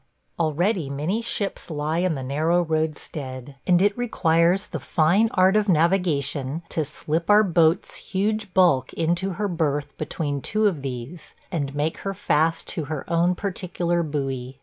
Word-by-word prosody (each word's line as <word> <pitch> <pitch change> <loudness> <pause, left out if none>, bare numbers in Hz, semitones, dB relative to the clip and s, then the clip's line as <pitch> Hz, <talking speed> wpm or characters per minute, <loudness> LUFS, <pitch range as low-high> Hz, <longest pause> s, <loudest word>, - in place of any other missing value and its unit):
Already 170 +1 +1
many 155 +11 -1
ships 215 -5 -3
lie 155 +1 -1
in 180 -2 +1
the 135 - -5
narrow 160 +6 +1
roadstead, 145 -4 -3
and 175 -1 +5
it 205 0 +3
requires 180 -6 +2
the - - -5
fine 180 +8 +2
art 185 +2 +4
of 210 -1 +2
navigation 160 -4 +1
to 160 - 0
slip 155 +3 -3
our 210 +1 +7
boat's 170 -2 +2
huge 205 +1 -2
bulk 170 -9 +4
into 175 +4 0
her 205 +3 -2
berth 150 -5 -1
between 145 -3 -3
two 215 +10 0
of 180 -9 +1
these 135 +5 -7 0.2
and 145 -5 -2
make 150 +2 -1
her 195 0 -4
fast 165 0 +1
to 160 - -3
her 150 -1 -5
own 175 +2 +3
particular 175 -3 -2
buoy. 135 -4 -3
165 Hz, 155 wpm, -24 LUFS, 145-185 Hz, 0.2 s, our